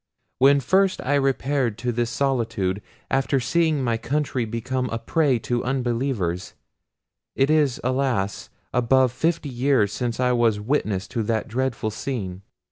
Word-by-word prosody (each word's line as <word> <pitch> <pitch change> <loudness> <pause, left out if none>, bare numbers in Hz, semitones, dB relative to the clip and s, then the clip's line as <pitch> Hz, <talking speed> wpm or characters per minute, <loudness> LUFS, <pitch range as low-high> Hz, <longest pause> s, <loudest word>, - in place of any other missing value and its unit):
When 140 +1 +5
first 190 +8 +2
I 140 - 0
repaired 135 -4 +1
to 120 +1 -2
this 120 0 -1
solitude, 115 -7 -1 0.3
after 135 0 +2
seeing 155 +1 +1
my 115 -2 +1
country 130 0 -1
become 125 +3 -2
a 115 - -2
prey 145 +1 +1
to 120 -1 0
unbelievers—it 120 -8 -2 1.0
is 150 -5 +2
alas! 130 -6 -1 0.2
above 125 +1 +3
fifty 160 +3 -1
years 125 -5 +1
since 120 -2 -3
I 125 -1 +2
was 115 -4 +2
witness 105 -5 -1
to 120 -3 -2
that 110 0 -1
dreadful 120 -2 -2
scene! 100 -7 -4
125 Hz, 135 wpm, -23 LUFS, 115-135 Hz, 1.0 s, When